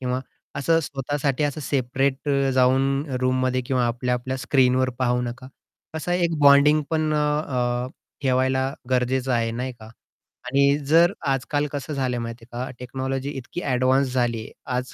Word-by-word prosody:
किंवा 125 0 -1 0.4
असं 165 +4 +3
स्वतःसाठी 140 0 -2
असं 145 +1 -2
सेपरेट 135 +1 -1 0.3
जाऊन 130 +1 +4 0.4
रूममध्ये 130 0 +1
किंवा 125 -2 +1
आपल्या 125 +1 -1
आपल्या 130 +2 -3
स्क्रीनवर 130 -1 +2
पाहू 125 -1 +1
नका. 125 +2 -6 0.5
असा 160 +3 -2
एक 170 -2 +1
बॉन्डिंग 145 +1 +6
पण 155 -1 +1
अ, 130 -5 0 0.4
ठेवायला 130 +1 +1 0.2
गरजेचं 130 +1 +1
आहे, 115 -1 +1
नाही 125 +2 -3
का? 110 -2 -14 0.6
आणि 140 +1 +3
जर 170 +3 +6 0.2
आजकाल 140 +2 0
कसं 145 +1 -4
झालंय 130 -3 -1
माहिती 115 0 -7
आहे 120 +1 -3
का, - - -8
टेक्नॉलॉजी 130 +2 -3
इतकी 135 +7 -6
एडवान्स 130 +1 +2
झालीये 120 -3 -1 0.2
आज 125 +1 -3
130 Hz, 145 wpm, -23 LUFS, 125-140 Hz, 0.6 s, बॉन्डिंग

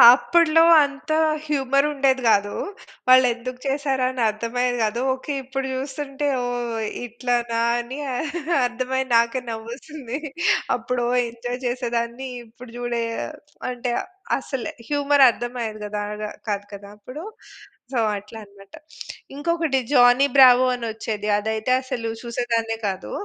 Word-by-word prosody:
అప్పడ్లో 330 +1 +4 0.2
అంత 285 +2 -5 0.3
హ్యూమరుండేది 275 -1 +2
గాదు. 205 -2 +3 0.5
వాళ్ళేందుకు 255 -1 +4
చేసారని 265 -2 0
అర్థమయ్యేది 245 +3 -1
గాదు. 220 +3 -1
ఓకే. 265 +3 -5
ఇప్పుడు 265 +1 -4
జూస్తుంటే, 275 +2 -3 0.2
ఓహ్! 240 -1 -3 0.3
ఇట్లనా 240 -1 -1 0.2
అని 240 +3 -6 0.7
అర్థమై 255 +2 -1
నాకే 235 +2 +3
నవ్వొస్తుంది. 240 +4 -6 0.6
అప్పుడు 250 -1 -2
ఓ - - +1 0.2
ఎంజాయ్ 245 +2 -5
చేసేదాన్ని. 240 +1 -2 0.2
ఇప్పుడు 235 +1 -14
జూడే 240 -1 -2 0.7
అంటే 245 0 -3 0.5
అసలు 265 -4 -4 0.2
హ్యూమర్ 285 -1 +4
అర్థమయ్యేది 235 -2 -4 0.2
గాదా 210 +1 -4 0.2
కాదు 205 0 -2
కదా! 200 0 -9
అప్పుడు. 255 +9 -9 0.7
సో, - - 0 0.2
అట్లా 210 +3 -10
అన్నమాట. 200 -1 -16 0.6
ఇంకొకటి 320 -2 0
జానీ 245 +1 +6
బ్రావో 255 -1 +8
అని 240 -1 -5
ఒచ్చేది. 215 -1 -4
అదైతే 220 +3 -2
అసలు 235 -3 -4
చూసేదాన్నే 230 -1 -1
కాదు. 190 -1 -4
245 Hz, 110 wpm, -23 LUFS, 230-265 Hz, 0.7 s, బ్రావో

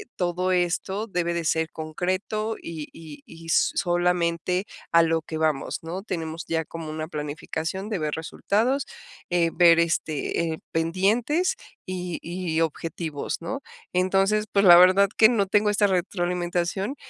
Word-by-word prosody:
todo 180 +1 -1
esto 185 +4 0
debe 175 -3 -1
de 170 -1 -2
ser 160 +1 +1
concreto, 185 +7 -2
y 160 -3 -6
y 165 - -11
y 165 -7 -12
solamente 175 +1 +1 0.3
a 170 0 +6
lo 165 0 +1
que 160 - -5
vamos, 155 -3 0
¿no?, 175 +4 -5
tenemos 165 -4 -4
ya 160 -1 -1
como 165 -2 -7
una 155 0 -4
planificación 160 +5 -4
de 205 -6 -2
ver 150 -1 -2
resultados, 220 - 0 0.5
eh, 170 -1 +3
ver 170 -1 +6
este, 165 0 0
eh, - - -7
pendientes, 220 - +1 0.3
y 180 -2 -4
y 170 -1 -2
objetivos, 160 -1 -3
¿no?, 265 +11 -4 0.3
entonces, 195 +3 +2
pues, 200 0 +3
la 175 - +10
verdad 185 +2 +6
que 220 0 +7
no 210 -5 +2
tengo 210 +2 +3
esta 205 0 +3
retroalimentación 180 +3 -1
175 Hz, 145 wpm, -25 LUFS, 165-195 Hz, 0.5 s, la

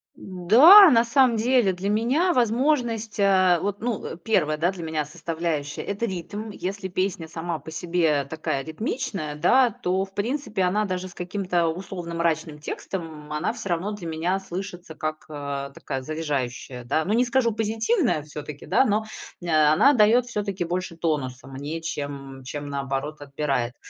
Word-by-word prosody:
Да, 250 - +8
на 235 -3 +4
самом 245 -1 +4
деле, 235 -4 +3
для 190 +3 -3
меня 260 - +2
возможность, 235 -3 +1
а, 185 -3 +4
вот, 205 +1 -3
ну, 235 -2 -2
э, 165 - -6
1, 170 -8 +1
да, 175 +4 +1
для 180 -3 -8
меня 155 -2 -2
составляющая- 160 -2 -3
это 205 +4 -2
ритм. 205 +4 -5
Если 195 0 -5
песня 185 -3 -2
сама 165 0 -4
по - - -11
себе 160 -3 +1
такая 140 -3 -3
ритмичная, 190 - -4
да, 250 - +4
то 190 -1 -1
в 195 - -21
принципе 215 -3 -1
она 210 +4 +1
даже 185 -1 -3
с 180 - -13
каким-то 180 -2 -1
условно 170 0 -5
мрачным 160 -2 -1
текстом, 170 +4 -5 0.2
м, 150 - -13
она 150 +8 -1
всё 235 -5 -7
равно 175 +5 -1
для 195 -5 -6
меня 170 +4 -1
слышится 180 -3 -7
как, 155 0 -4
а, 140 -2 -4
такая 135 -1 -5
заряжающая, 135 -5 -4
да. 145 +6 0
Ну 205 - 0
не 240 +2 +4
скажу 240 -1 +2
позитивная 225 - 0
всё-таки, 150 -1 -8
да, 265 - +3
но, 215 +1 +1 0.4
э, - - -5
она 155 - +5
дает 230 +2 +5
всё-таки 205 -6 -3
больше 175 -1 -3
тонуса 130 -6 -2
мне, 145 +4 -5
чем, 140 -4 -6
чем 145 +2 -6
наоборот 140 +2 -3
отбирает. 140 -4 -2
180 Hz, 165 wpm, -24 LUFS, 155-215 Hz, 0.4 s, Да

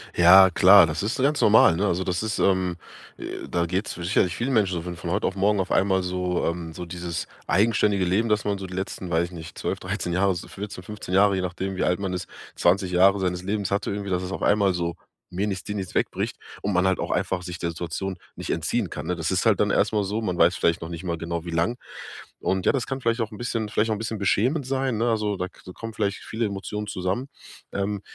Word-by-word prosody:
Ja 95 +2 +8
klar, 95 0 +7
das 75 +5 -3
ist 110 - -1
so 135 - -1
ganz 145 +2 +2
normal, 105 -6 +6
ne? 100 +4 0
Also, 90 +1 0
das 90 +3 -1
ist, 110 -1 -2
ähm, 95 -2 +2 0.4
äh, - - -6
da 85 0 0
geht's 95 +4 -2
sicherlich 90 0 0
vielen 130 +3 -1
Menschen 100 -5 +2
so 85 0 -3
wenn 90 -1 -5
von 85 0 -5
heute 100 +3 +1
auf 95 - -3
morgen 100 +1 +2
auf 95 - -2
einmal 95 -1 +3
so, 90 0 -1
ähm, 85 -1 -3
so 90 - -6
dieses 85 -1 -5 0.2
eigenständige 100 0 +2
Leben, 100 +6 +1
dass 105 0 +2
man 100 -1 0
so 95 - -6
die 90 - -9
letzten, 95 -1 -4
weiß 85 +1 +2
ich 85 - -10
nicht, 80 -2 -9
12, - - -2
13 90 - -3
Jahre, 95 +1 +2
so 85 - -7
14, 100 -2 -7
15 105 -2 -7
Jahre, 100 0 +5
je 95 - -1
nachdem 95 +1 -3
wie - - -1
alt 90 +2 +1
man 95 -2 -2
ist, 90 - -4 0.3
20 90 +1 +2
Jahre 95 +2 +5
seines 90 -1 -1
Lebens 100 0 -1
hatte 100 0 0
irgendwie, 100 -1 -4
dass 90 0 0
es 90 - -5
auf - - -4
einmal 100 -2 +3
so 85 -1 -2 0.4
mir 95 +4 -1
nichts 95 -3 -3
dir 105 - -5
nichts 95 -3 -5
wegbricht - - -1 0.3
und 100 0 0
man 90 +1 +3
halt 95 - +2
auch - - -2
einfach 90 -1 -1
sich 90 -1 -6
der 85 - -1
Situation 90 +3 -4 0.2
nicht - - -7
entziehen - - -1
kann, - - -6
ne? 90 - -1
Das 80 -1 -2
ist 95 +3 0
halt 110 -3 +4
dann 105 - +3
erst 105 +2 +2
mal 105 -1 +2
so, 105 +4 -2
man 90 -4 -2
weiß 85 +2 +5
vielleicht 85 -1 +1
noch 80 - -6
nicht 85 +1 -7
mal 85 -2 -3
genau 85 0 -4
wie 85 - -5
lang. 85 +9 0 0.6
Und 95 -1 0
ja, - - +5
das 130 -4 -2
kann 135 0 -3
vielleicht 115 -1 0
auch 110 - -2
'n 105 - -9
bisschen 115 -3 -2
vielleicht 110 +1 +1
auch - - +3
'n 105 - -4
bisschen 110 -1 -3
beschämend 125 - +1
sein, 130 -3 -1
ne? 115 +2 +1
Also, 105 -2 0
da 90 - -2
k - - -21
da 90 - -10
kommen 115 +3 -8
vielleicht 100 -3 -2
viele 115 +1 -2
Emotionen 105 +1 -5
zusammen, 95 +8 -2 0.5
ähm, 100 0 -2
95 Hz, 260 wpm, -25 LUFS, 90-105 Hz, 0.6 s, Ja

